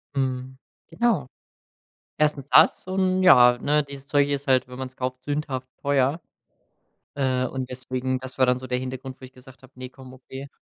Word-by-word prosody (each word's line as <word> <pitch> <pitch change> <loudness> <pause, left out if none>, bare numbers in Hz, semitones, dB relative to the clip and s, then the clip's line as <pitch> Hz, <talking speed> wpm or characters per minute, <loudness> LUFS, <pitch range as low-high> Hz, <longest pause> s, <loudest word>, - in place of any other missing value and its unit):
Mhm, 130 -1 -2 0.3
genau. 225 - 0 0.9
1. 150 -3 +1
das 160 - +5
und 185 0 +1
ja, 125 -9 +7
ne, 150 +3 +1
dieses 140 -1 -11
Zeug 145 -1 +2
ist 140 0 -3
halt, 130 -1 +3
wenn 125 0 -11
man’s 130 0 -7
kauft, 130 0 -4
sündhaft 140 -2 -3
teuer, 140 +3 +1 0.9
äh, 130 -2 0
und 130 0 -5
deswegen 130 0 -3
das 130 0 -10
war 130 - +4
dann 125 0 +2
so 130 - -8
der 125 0 -1
Hintergrund, 130 +1 -7
wo - - -11
ich 130 - -12
gesagt 130 +1 -17
habe: 130 - -17
„Ne, 130 0 -8
komm, 130 -1 -13
okay.“ 130 +1 -10
130 Hz, 180 wpm, -24 LUFS, 130-140 Hz, 0.9 s, ja